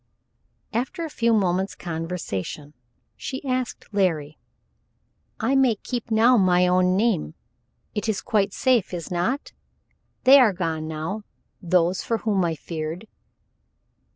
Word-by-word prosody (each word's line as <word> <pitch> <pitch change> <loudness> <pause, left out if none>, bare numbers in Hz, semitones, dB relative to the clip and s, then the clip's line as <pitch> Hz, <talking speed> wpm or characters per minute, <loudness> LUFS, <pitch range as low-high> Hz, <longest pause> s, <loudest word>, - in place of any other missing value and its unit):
After 265 +9 -2
a 315 - -7
few 235 -3 +1
moments' 190 -2 +1
conversation 160 - -5 0.4
she 265 +1 -6
asked 255 -4 -3
Larry: 160 -7 0 1.0
"I 240 +4 +1
may 265 -4 +4
keep 240 +3 -5
now 230 +3 +5
my 180 -2 +4
own 180 +1 +3
name, 200 - 0 0.6
it 210 +2 -2
is 215 - 0
quite 205 -2 +1
safe, 240 -5 +1
is 170 -1 -6
not? 180 +11 -1 0.7
They 270 +2 +8
are 230 -6 +5
gone 165 -3 -2
now 160 +7 -4 0.4
those 180 0 +2
for 230 - -1
whom 205 -4 0
I 165 -2 0
feared." 160 +5 -6
190 Hz, 125 wpm, -24 LUFS, 170-230 Hz, 1.0 s, They